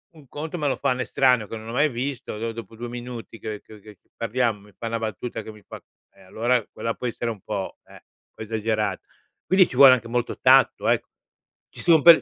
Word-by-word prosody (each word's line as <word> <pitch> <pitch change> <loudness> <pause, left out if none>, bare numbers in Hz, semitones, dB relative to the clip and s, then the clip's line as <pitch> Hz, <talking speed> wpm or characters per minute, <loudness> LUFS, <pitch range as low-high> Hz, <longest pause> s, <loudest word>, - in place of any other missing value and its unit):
un 150 -4 -16
conto, 155 +6 -5
me 150 -3 -1
lo 135 - +1
fa 140 - 0
un 125 - -1
estraneo 125 -4 +2
che 115 - -6
non 110 0 -8
ho - - -4
mai 145 +6 +3
visto, 120 -3 -4
dopo 115 0 -9
2 120 +2 -6
minuti 120 -2 -8
che 105 -2 -6
che 110 -1 -14
che 105 -1 -15 0.2
parliamo, 115 -1 0
mi 105 - -18
fa 115 - -5
una 115 0 -2
battuta 110 +1 -4
che 110 - -9
mi 105 -1 -16
fa - - -10 0.3
e, - - -22
allora, 115 +6 0
quella 115 0 -3
può 125 - -4
essere 120 0 -2
un 110 - -8
po', 95 +1 -4
eh, - - -17
un - - -14 0.3
po' - - -7
esagerato. 110 -2 -1 0.4
Quindi 185 -1 +5
ci - - -8
vuole 135 -1 +10
anche 120 -2 -1
molto 120 0 -1
tatto, - - +5
ecco. - - +1 0.6
Ci - - -15
son 165 -3 +5
per 170 +2 +9
115 Hz, 230 wpm, -24 LUFS, 110-130 Hz, 0.6 s, vuole